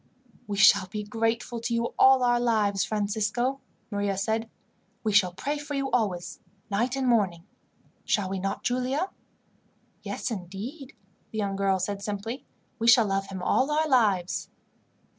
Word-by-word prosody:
"We 205 -1 -3
shall 200 -1 +6
be 210 +2 -5
grateful 225 +2 -1
to 235 +1 -2
you 235 0 -1
all 265 -1 +6
our 240 -1 +3
lives, 215 -5 +2
Francisco," 220 +5 -1 0.3
Maria 200 -1 -1
said. 220 +3 -1 0.5
"We 220 - +1
shall 190 -3 +5
pray 290 +11 -3
for 290 0 -5
you 275 -1 -2
always, 195 -7 -1 0.3
night 240 +6 0
and 265 -1 -1
morning. 195 -8 +2 0.6
"Shall 205 -3 +1
we 190 0 -3
not, 195 +1 -3
Giulia?" 255 +8 -1 0.9
"Yes, 255 - -4
indeed," 220 - -7 0.3
the 220 - -7
young 200 -2 -1
girl 195 -1 +2
said 195 +2 -3
simply. 210 +5 -4 0.4
"We 230 - 0
shall 235 -1 +7
love 195 -1 -1
him 190 -2 -6
all 265 +8 +2
our 310 +1 +1
lives." 205 - +2
220 Hz, 155 wpm, -27 LUFS, 195-245 Hz, 0.9 s, shall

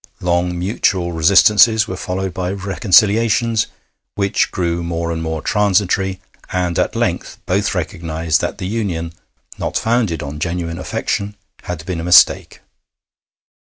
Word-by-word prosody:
Long 90 0 0
mutual 90 -1 0
resistances 105 +6 +5
were 95 - -4
followed 95 0 -4
by 90 0 -3
reconciliations, 110 +3 +2 0.5
which 100 -1 0
grew 85 -1 -2
more 85 0 -3
and 80 -1 -3
more 80 -1 -4
transitory, 95 -2 +1 0.3
and 90 -2 -1
at - - 0
length - - -2
both - - 0
recognised 80 -1 -1
that - - -3
the - - -5
union, 90 -6 -3 0.5
not - - -2
founded 110 -10 0
on 75 +1 -7
genuine 85 0 -3
affection, 105 0 -3 0.3
had 85 -3 -6
been 90 -2 -4
a - - -4
mistake. 90 0 +4
90 Hz, 130 wpm, -18 LUFS, 85-100 Hz, 0.5 s, resistances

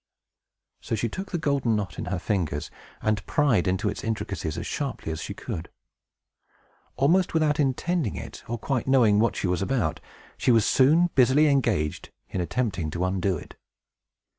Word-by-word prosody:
So - - -2
she 115 +2 -1
took 190 - -6
the 175 - 0
golden 140 -7 +1
knot 95 -4 -3
in - - -3
her 95 - -2
fingers, 85 -6 -2 0.3
and 110 -1 +1
pried 125 -11 +2
into 95 +3 0
its 100 - -3
intricacies 100 -7 -3
as - - -4
sharply 80 - -3
as 80 - -4
she - - -5
could. 80 +1 -6 1.3
Almost 165 +7 +2
without 155 -1 +2
intending 145 - 0
it, - - -8
or 120 - -2
quite 130 +3 -2
knowing 115 -6 +5
what 115 +1 +2
she - - -2
was 90 0 0
about, 125 +4 0 0.4
she - - 0
was 115 -3 +5
soon 160 +6 +4
busily 130 +4 +5
engaged 115 - +1 0.2
in 90 - -2
attempting 90 -5 -1
to 85 +3 -2
undo 95 0 0
it. - - -11
115 Hz, 165 wpm, -26 LUFS, 95-140 Hz, 1.3 s, knowing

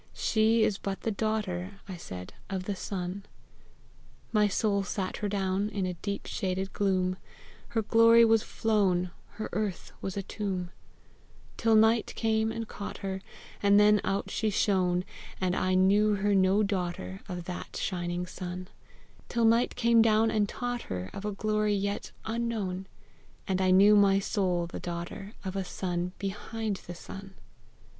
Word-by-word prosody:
She 220 0 +3
is 205 - +1
but 195 -1 -4
the 225 - -1
daughter," 205 -3 -2
I 190 - -5
said, 90 - -8 0.2
"of 190 -1 -2
the 200 +1 -3
sun!" 185 0 -4 1.1
My 210 -1 +4
soul 200 0 +1
sat 195 -1 -3
her 205 - -2
down 195 0 0
In 200 -3 -2
a 180 - -2
deep 200 +3 -4
shaded 190 0 -2
gloom; 185 -2 +1 0.5
Her 225 -1 -1
glory 230 +2 +6
was 225 -1 +4
flown, 195 -6 +1 0.2
Her 215 +1 -4
earth 210 -4 -2
was 190 0 -4
a 200 - -2
tomb, 185 -3 -3 0.8
Till 225 -1 +3
night 220 +1 +4
came 220 -1 +1
and 225 0 -4
caught 205 - -6
her, 190 0 -3 0.4
And 200 0 +6
then 210 0 +5
out 195 +1 -1
she 220 - 0
shone; 185 -3 +2 0.3
And 185 -1 +1
I 185 0 +1
knew 205 +3 +4
her 205 +1 +1
no 195 +2 +4
daughter 175 - -3
Of 180 -1 -4
that 180 +1 -6
shining 175 -1 -2
sun 180 0 -6 0.6
Till 235 -1 +2
night 230 +2 +3
came 235 -1 +5
down 225 0 +4
and 210 -2 +1
taught 245 -1 -3
her 90 +1 -4
Of 195 - -6
a 210 - -1
glory 210 +1 +1
yet 200 +1 -2
unknown; 220 -5 -2 0.6
And 190 -1 0
I 185 - +3
knew 200 +3 +7
my 200 -1 +5
soul 185 -3 0
the 170 - -7
daughter 175 +4 -6
Of 190 0 -4
a 195 - -1
sun 180 -1 -3
behind 210 +1 -3
the 175 - -6
sun. 195 +2 -10
200 Hz, 160 wpm, -29 LUFS, 185-215 Hz, 1.1 s, knew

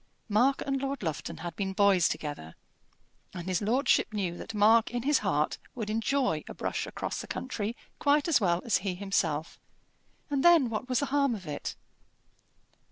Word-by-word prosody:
Mark 245 +7 +3
and 275 -1 -1
Lord 275 -3 -3
Lufton 160 -4 -4
had 170 -1 -5
been 190 0 -2
boys 195 -3 +4
together, 145 - -5 0.8
and 175 -2 -6
his 185 0 0
lordship 240 +3 +2
knew 190 -5 -2
that 215 - -8
Mark 220 +2 +5
in 245 -1 -3
his 290 +2 +3
heart - - 0 0.2
would 220 -4 -3
enjoy 225 - 0
a - - -7
brush - - -3
across - - -4
the - - -9
country 230 -3 -4 0.2
quite 290 +1 +3
as 310 -7 +3
well 175 -2 +1
as 235 - +3
he 190 -1 -3
himself; 170 -5 -1 0.7
and 280 -3 -1
then 330 -9 +6
what 225 +4 -4
was 255 +1 +1
the - - +1
harm 280 -4 +3
of 190 -4 -9
it? 150 -2 -5
215 Hz, 175 wpm, -29 LUFS, 185-270 Hz, 0.8 s, then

